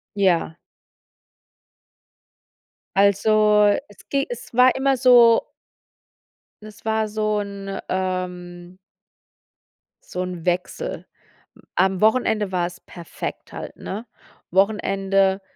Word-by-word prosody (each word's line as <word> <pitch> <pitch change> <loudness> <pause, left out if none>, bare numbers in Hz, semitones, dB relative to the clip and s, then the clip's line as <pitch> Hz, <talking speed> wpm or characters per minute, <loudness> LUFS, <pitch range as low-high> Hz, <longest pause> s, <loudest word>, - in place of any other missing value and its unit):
Ja. 175 -5 +1 2.4
Also 210 +1 +4 0.2
es 205 - -19
ge 275 0 0
es 240 -1 -8
war 250 +1 +5
immer 270 0 +1
so 240 -2 +6 1.2
Es 215 0 -13
war 220 0 0
so 215 0 -1
'n, 200 -1 -6
ähm 180 -1 -4 1.3
so 180 - -5
'n 180 -2 -7
Wechsel. 180 0 -2 0.7
Am 190 -1 +1
Wochenende 215 -2 +2
war 175 -2 0
es 175 0 -11
perfekt 170 -2 -8
halt, - - -7
ne? 215 +5 -6 0.5
Wochenende, 195 0 +1
200 Hz, 95 wpm, -22 LUFS, 185-220 Hz, 2.4 s, so